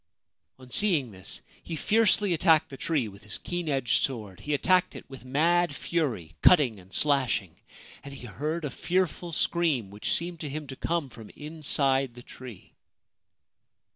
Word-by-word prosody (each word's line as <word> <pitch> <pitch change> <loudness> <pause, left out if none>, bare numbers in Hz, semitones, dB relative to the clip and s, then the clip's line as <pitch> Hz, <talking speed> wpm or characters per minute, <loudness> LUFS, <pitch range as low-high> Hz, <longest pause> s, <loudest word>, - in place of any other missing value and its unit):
On 130 -1 -14
seeing 160 - +3
this 95 -2 -9 0.2
he 165 - -6
fiercely 205 +2 +3
attacked 160 -2 +3
the - - -6
tree 140 -4 -1
with 100 -1 -12
his 105 - -5
keen 175 -2 -4
edged 135 -5 +2
sword. 110 -8 -3
He 150 0 -1
attacked 180 +5 +2
it - - -9
with 135 -2 -11
mad 170 +7 +2
fury, 115 - -2
cutting 135 - +5
and 95 +1 -18
slashing; 130 - +1 0.5
and 140 - -9
he 135 -3 -9
heard 150 +7 -3
a 140 - -3
fearful 175 +2 -1
scream 155 - 0
which 105 +1 -3
seemed 170 0 -2
to 150 - -4
him 150 +2 -5
to 135 -1 -8
come 165 -1 -2
from 110 -4 -12
inside 140 -4 0
the 125 - -11
tree. 125 -6 -12
145 Hz, 165 wpm, -28 LUFS, 120-170 Hz, 0.5 s, cutting